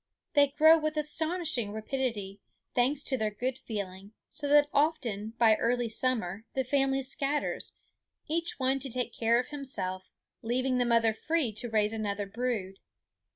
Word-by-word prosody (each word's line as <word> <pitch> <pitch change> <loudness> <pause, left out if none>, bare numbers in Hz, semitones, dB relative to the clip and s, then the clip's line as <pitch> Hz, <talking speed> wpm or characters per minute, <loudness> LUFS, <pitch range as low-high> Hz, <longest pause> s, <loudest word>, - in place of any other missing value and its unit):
They 285 -1 +6
grow 315 +3 +6
with 310 0 -2
astonishing 305 - 0
rapidity, 220 -4 -3 0.3
thanks 270 +4 +2
to 265 - +1
their 215 -1 +1
good 245 +5 -3
feeding, 200 -1 -6 0.2
so 290 - -2
that 290 0 +6
often 240 -8 0
by 225 -2 +6
early 240 0 0
summer 220 -5 -1
the 265 - +1
family 270 0 +1
scatters, 280 +2 -2 0.5
each 335 +2 -1
one 265 0 +1
to 270 0 -4
take 245 -1 -3
care 230 +1 +3
of 250 - -3
himself, 195 -10 -4 0.3
leaving 255 +2 0
the 245 - +2
mother 230 -2 +3
free 300 -1 0
to 235 +3 -4
raise 215 -1 +1
another 205 -2 -2
brood. 200 -3 -3
245 Hz, 155 wpm, -30 LUFS, 215-280 Hz, 0.5 s, They